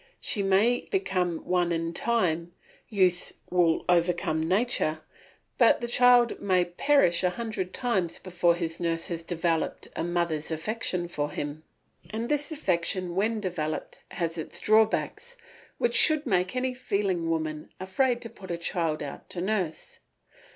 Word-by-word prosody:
She 210 - -1
may 200 +5 +2
become 180 - -1
one 175 -1 +1
in 165 0 -1
time; 175 -6 0 0.4
use 185 -4 +2 0.2
will 175 -3 +2
overcome 175 -2 +2
nature, 180 -3 0 0.6
but - - +6
the 240 - -3
child 245 0 +4
may 185 -3 +2
perish 175 0 +2
a 180 - +4
hundred 200 -2 -4
times 200 -10 -1
before 175 -2 +1
his 165 -1 -4
nurse 165 -1 -1
has 170 -1 -3
developed 165 -1 -2
a - - -2
mother's 170 -3 -1
affection 180 +1 -2
for 145 -3 -2
him. 145 +1 -5 0.5
And 225 +2 -4
this 295 +1 0
affection 185 - -1
when 215 +4 0
developed 165 -6 -4
has 165 -1 -3
its 160 - -5
drawbacks, 220 - +1 0.4
which 480 - +1
should 310 -1 +5
make 185 -2 0
any 255 0 0
feeling 200 -8 -1
woman 155 -2 -2
afraid 240 +7 0
to 230 - -6
put 195 -4 -12
her 170 - -2
child 165 -3 -1
out 140 - -8
to 180 - -4
nurse. 185 -4 -2
180 Hz, 145 wpm, -27 LUFS, 170-220 Hz, 0.6 s, but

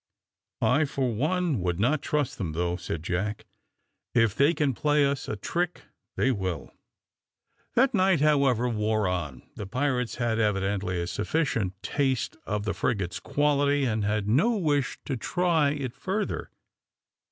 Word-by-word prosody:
"I, 145 +5 +4
for 135 -4 -1
one, 155 - 0
would 90 -1 -1
not 135 +7 +2
trust 145 -5 -1
them, 85 -6 -2
though," 85 +2 0
said 90 -3 -5
Jack; 95 +5 -2 0.7
"if 115 -4 +4
they 145 +7 +3
can 145 -3 +1
play 150 +1 +2
us 140 -1 -1
a - - -2
trick 175 - -2 0.3
they 135 - +2
will." 95 - -3 1.0
The 260 +3 +6
night, 190 -5 +3
however, 140 -5 +3
wore 110 -2 0
on. 80 -9 -3
The 100 - -5
pirates 125 +1 -1
had 120 -2 0
evidently 95 -3 0
a 85 - -1
sufficient 105 - -1
taste 135 - 0
of 105 -1 -1
the 105 - 0
frigate's 90 -2 -1
quality, 145 +2 +2
and 110 -3 0
had 105 0 0
no 195 - +3
wish 145 -7 0
to 135 - -2
try 165 +2 +1
it 140 -4 -3
further. 200 +8 -3
125 Hz, 150 wpm, -27 LUFS, 100-145 Hz, 1.0 s, The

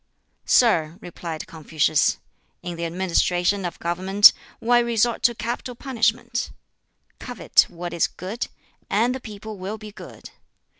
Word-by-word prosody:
"Sir," 165 -9 +3
replied 170 -2 -7
Confucius, 155 -3 +1 0.5
"in 175 -1 -5
the 170 0 -4
administration 180 +2 0
of 175 - -5
government 190 +4 +5 0.3
why 240 +1 +3
resort 235 -1 +1
to 235 - +3
capital 240 +3 -4
punishment? 235 -1 -1 0.7
Covet 245 -3 +2
what 175 0 -7
is 170 - +2
good, 200 +7 -5 0.4
and 230 +5 +2
the 260 - -5
people 215 -2 -9
will 195 +4 -5
be 215 -1 -10
good. - - -12
200 Hz, 130 wpm, -23 LUFS, 175-235 Hz, 0.7 s, government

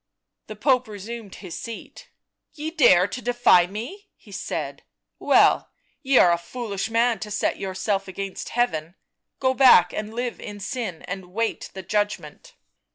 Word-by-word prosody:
The 215 - -7
Pope 255 +2 +2
resumed 215 0 -8
his 185 -4 -8
seat. 230 -1 -9 0.2
" - - -53
Ye 310 +1 -4
dare 240 - +5
to 250 +5 -5
defy 240 -7 +4
me," 255 - -8
he - - -18
said. - - -4 0.2
" - - -58
Well - - +4 0.2
— - - -43
ye 270 -2 +3
are 175 - +7
a 170 - +1
foolish 205 +2 -4
man 230 -1 +2
to 210 - -6
set 210 0 -1
yourself 195 +1 -2
against 195 +1 -6
Heaven; 170 -9 -1 0.4
go 260 -1 +2
back 250 -10 +6
and 215 0 -4
live 245 0 -3
in 205 0 -8
sin 200 - -4
and 190 -1 -6
wait 225 +3 -2
the 190 - -6
judgment." 210 - -3
215 Hz, 165 wpm, -24 LUFS, 190-245 Hz, 0.4 s, are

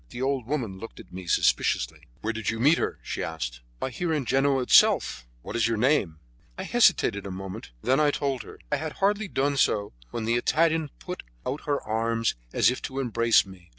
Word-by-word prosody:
The 125 +1 -5
old 135 -3 -1
woman 120 -10 -2
looked 115 - -9
at - - -14
me 90 -1 -8
suspiciously. - - +1
"Where 115 +1 -1
did 110 -3 -2
you 115 - -2
meet 145 +7 +5
her?" - - -2
she - - -4
asked. - - -5 0.2
"Why, 130 - -3
here 165 +7 -2
in 150 -4 0
Genoa 135 +1 +2
itself." - - +4 0.2
"What - - -6
is 115 -1 +2
your 115 -1 0
name?" 110 - +2 0.4
I - - -4
hesitated 100 0 +3
a - - -5
moment, 95 0 -7
and - - 0
then 135 - +4
I 150 -1 +4
told 140 -3 -1
her. - - -12
I 150 - +2
had 155 +1 -4
hardly 205 +2 +1
done 140 -4 0
so 105 - +1 0.2
when 115 -2 -4
the 115 +1 +2
Italian 160 +4 +2
put 180 0 -6 0.2
out 150 - -4
her 145 -1 +1
arms 115 +1 0 0.2
as - - +4
if 130 - -5
to 135 0 -4
embrace 115 -4 +3
me. 95 -3 -14
120 Hz, 215 wpm, -26 LUFS, 105-145 Hz, 0.4 s, meet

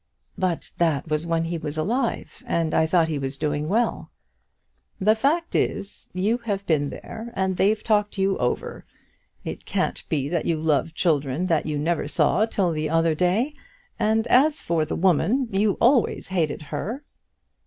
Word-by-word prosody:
"But 180 -3 -2
that 165 -3 +1
was 155 +2 -1
when 165 -1 +1
he 170 0 -3
was 150 0 -5
alive, 235 +9 -2
and 165 -2 0
I 160 - +3
thought 165 -1 +3
he 155 -3 -2
was 135 0 -4
doing 150 +1 -1
well." 230 +5 0 0.9
"The 215 +2 +4
fact 295 +9 0
is, 200 - -2
you 205 +6 0
have 200 -4 -3
been 145 -3 +1
there 225 +9 -8
and 190 0 0
they've 210 +4 +2
talked 210 -2 +1
you 195 0 +2
over. 125 - -2 0.6
It - - -6
can't - - -1
be 140 -3 0
that 170 -1 -1
you 165 -2 +1
love 155 0 0
children 150 -1 +1
that 165 -4 +1
you 150 -1 -1
never 160 0 0
saw 170 +8 +2
till 190 -5 0
the 155 -1 -2
other 165 0 +2
day; 185 - +1 0.5
and 220 +1 +2
as 290 +5 +4
for 165 -2 +1
the - - -3
woman, 190 - +2
you 200 +1 +2
always 240 -3 +2
hated 160 -5 -1
her." 195 - -5
175 Hz, 170 wpm, -24 LUFS, 155-215 Hz, 0.9 s, The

